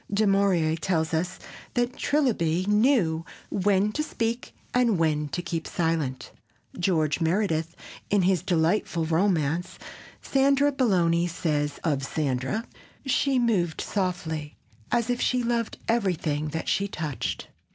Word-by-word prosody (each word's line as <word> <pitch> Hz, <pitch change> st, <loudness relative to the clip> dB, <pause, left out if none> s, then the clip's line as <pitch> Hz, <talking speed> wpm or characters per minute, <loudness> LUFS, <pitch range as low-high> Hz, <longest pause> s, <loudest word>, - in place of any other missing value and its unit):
Du 210 Hz, +2 st, +2 dB
Maurier 195 Hz, -5 st, +3 dB
tells 165 Hz, -2 st, -1 dB
us 175 Hz, +3 st, -1 dB, 0.4 s
that 245 Hz, 0 st, 0 dB
Trilby 185 Hz, -, +1 dB
knew 210 Hz, -, +3 dB, 0.3 s
"when 200 Hz, +1 st, +2 dB
to 305 Hz, -, -2 dB
speak 235 Hz, -5 st, -2 dB, 0.2 s
and 240 Hz, -5 st, +3 dB
when 155 Hz, -2 st, +1 dB
to 175 Hz, +5 st, -3 dB
keep 170 Hz, -2 st, -3 dB
silence." 160 Hz, -6 st, -1 dB, 0.5 s
George 165 Hz, -3 st, +1 dB
Meredith, 165 Hz, -2 st, 0 dB, 0.3 s
in 200 Hz, -2 st, +3 dB
his 185 Hz, -1 st, +2 dB
delightful 170 Hz, -1 st, +1 dB
romance, 165 Hz, -1 st, 0 dB, 0.4 s
Sandra 275 Hz, +1 st, +3 dB
Belloni, 175 Hz, -10 st, +2 dB
says 150 Hz, -4 st, -1 dB
of 145 Hz, -4 st, +1 dB
Sandra, 140 Hz, -, -1 dB, 0.4 s
"She 270 Hz, 0 st, +2 dB
moved 200 Hz, -9 st, +1 dB
softly 160 Hz, -6 st, -3 dB, 0.3 s
as 235 Hz, 0 st, +1 dB
if 245 Hz, -, -1 dB
she 250 Hz, -1 st, +1 dB
loved 235 Hz, -1 st, -1 dB
everything 170 Hz, -9 st, 0 dB
that 160 Hz, +2 st, -4 dB
she 200 Hz, -, +1 dB
touched." 150 Hz, -, -4 dB
180 Hz, 125 wpm, -26 LUFS, 160-220 Hz, 0.5 s, Maurier